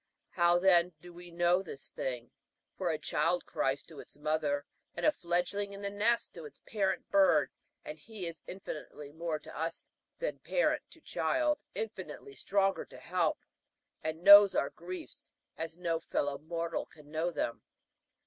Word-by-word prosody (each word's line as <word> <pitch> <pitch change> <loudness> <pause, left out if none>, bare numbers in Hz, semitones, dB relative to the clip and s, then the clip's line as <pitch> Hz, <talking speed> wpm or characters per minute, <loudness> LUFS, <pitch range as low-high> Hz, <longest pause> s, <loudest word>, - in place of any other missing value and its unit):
How, 175 -1 +4
then, 180 -1 +5
do 175 +2 -12
we 175 0 -11
know 175 +2 +3
this 155 -7 -9
thing? 120 -2 -4 0.4
For - - -1
a - - +1
child - - 0
cries - - 0
to - - -12
its - - -11
mother, 150 -1 0 0.3
and - - -2
a 305 - +7
fledgling 200 - -1
in 200 - -8
the 200 - -1
nest 220 +4 +1
to 165 -3 -9
its 150 - -12
parent 195 -3 -1
bird; 155 -9 +5 0.3
and 155 +1 -7
he 210 +3 -7
is 165 -1 -6
infinitely 150 -5 -7
more 160 0 -2
to 150 - -12
us 165 +2 -3 0.3
than - - -3
parent - - +1
to - - -17
child 305 -2 +1
infinitely 450 -2 -6
stronger 195 - +1
to - - -13
help, - - 0 0.6
and 160 +2 -4
knows 200 0 +10
our 140 - +1
griefs 180 +2 -8 0.2
as 160 +1 -5
no 170 -2 0
fellow 145 -3 -1
mortal 165 +1 -3
can 150 -1 -17
know 160 +2 0
them. 145 -8 -2
175 Hz, 165 wpm, -32 LUFS, 155-195 Hz, 0.6 s, knows